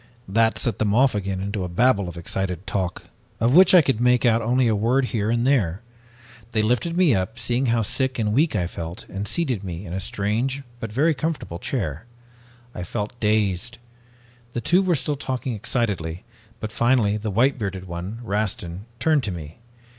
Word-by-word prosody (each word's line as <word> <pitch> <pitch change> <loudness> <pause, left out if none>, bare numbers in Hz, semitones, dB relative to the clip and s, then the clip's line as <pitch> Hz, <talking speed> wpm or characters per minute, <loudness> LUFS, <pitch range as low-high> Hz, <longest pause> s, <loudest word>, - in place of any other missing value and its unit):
"That 110 +3 +2
set 120 -4 -1
them 105 -1 +1
off 130 +2 +4
again 100 -2 -2
into 100 0 -3
a 90 - -4
babble 100 0 +2
of 85 - -9
excited 90 +1 -3
talk, 95 -3 -2 0.3
of 115 +3 +2
which 185 +3 +8
I 175 - +8
could 130 -4 0
make 125 0 +4
out 115 -1 +4
only 125 +2 +2
a 110 - +2
word 120 +6 +2
here 105 -2 0
and 120 +1 +1
there. 110 -9 +1 0.7
They 110 -2 +2
lifted 125 +10 0
me 180 -7 +5
up, 95 +3 -1
seeing 125 +2 0
how 115 -1 +2
sick 130 +5 0
and 105 -3 0
weak 150 +2 +2
I 90 -4 +1
felt, 85 0 -6
and 100 +2 -4
seated 130 - -1
me 90 0 -6
in 85 - -7
a 95 - -2
strange, 115 +9 -1 0.2
but 115 -2 -5
very 150 +8 +3
comfortable 150 - -3
chair. 90 - -3 0.7
I - - -6
felt 105 +6 -4
dazed. 105 +1 0 0.8
The 120 - -2
two 180 +8 +3
were 185 -3 +2
still 150 +1 0
talking 130 -2 -3
excitedly, 100 -6 -2 0.4
but 110 0 -5
finally 120 -3 +2
the 105 +1 -3
white 125 +7 +2
bearded 95 -3 -4
one, 90 +6 -6
Rastin, 100 -3 -3
turned 150 +1 +2
to 100 - -2
me. 80 +1 -8
110 Hz, 190 wpm, -23 LUFS, 95-125 Hz, 0.8 s, which